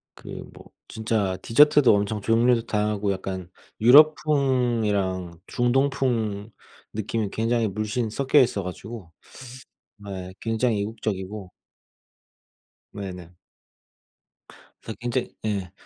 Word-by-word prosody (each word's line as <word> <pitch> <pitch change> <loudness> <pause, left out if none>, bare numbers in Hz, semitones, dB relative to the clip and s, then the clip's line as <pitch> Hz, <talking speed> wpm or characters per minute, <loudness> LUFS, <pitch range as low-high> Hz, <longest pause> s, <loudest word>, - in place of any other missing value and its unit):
그 - - -16 0.3
뭐 - - -14 0.2
진짜 110 -4 -1
디저트도 145 0 +5
엄청 105 +1 -1
종류도 115 +2 +2
다양하고 105 -2 0
약간 95 -1 -6 0.3
유럽풍이랑 120 - +3
중동풍 120 -5 0 0.4
느낌이 110 0 -2
굉장히 115 0 0
물씬 110 +3 -2
섞여 140 +5 +2
있어 110 -6 +2
가지고 95 0 -8 1.0
예 95 -1 -6
굉장히 115 -1 0
이국적이고 100 -2 -4 1.4
네네. 90 -4 -7 1.5
그래서 110 -3 -8
굉장히 120 +1 -3
예 100 -4 -2
110 Hz, 225 characters per minute, -24 LUFS, 100-120 Hz, 1.5 s, 디저트도